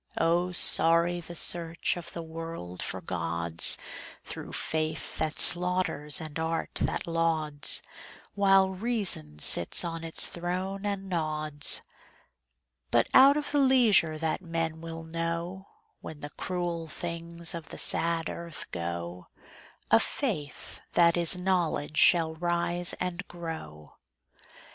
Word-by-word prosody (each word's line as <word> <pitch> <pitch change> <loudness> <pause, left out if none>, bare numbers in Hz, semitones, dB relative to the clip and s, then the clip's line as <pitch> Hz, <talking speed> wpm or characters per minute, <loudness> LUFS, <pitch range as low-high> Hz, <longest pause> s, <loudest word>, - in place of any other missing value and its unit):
Oh, 175 +2 +1
sorry 170 0 +4
the 170 +1 -10
search 170 -1 +1
of 170 -1 -8
the 170 - -7
world 160 - -8
for 95 +1 -3
gods, 85 -1 +1 0.5
Through - - -7
faith 155 0 -2
that 160 -1 -2
slaughters 175 -5 +4
and 155 -1 -7
art 160 0 -3
that - - -2
lauds, 160 -3 +1 0.5
While 195 -1 +3
reason 190 - -2
sits 85 - +4
on 165 -1 -5
its 165 -1 +3
throne 185 +3 -4
and 195 -1 -4
nods. 155 -4 +2 1.1
But - - +2
out 275 +2 +7
of 295 - -3
the 290 - +1
leisure 235 - +3
that 160 +3 -2
men 165 -2 -4
will 165 0 -7
know, 170 +3 -5 0.3
When 155 -2 -10
the 145 - -7
cruel 175 -2 -4
things 170 +1 -4
of 165 -3 -8
the - - -9
sad 165 -1 +2
earth 170 -2 -7
go, 85 +1 -6 0.6
A 110 - +6
Faith 170 - -3
that 170 -1 +4
is 175 +1 +4
Knowledge 175 -5 -1
shall 165 -2 +4
rise 175 +1 -1
and 180 +1 -4
grow. 160 - -9
165 Hz, 125 wpm, -27 LUFS, 155-175 Hz, 1.1 s, out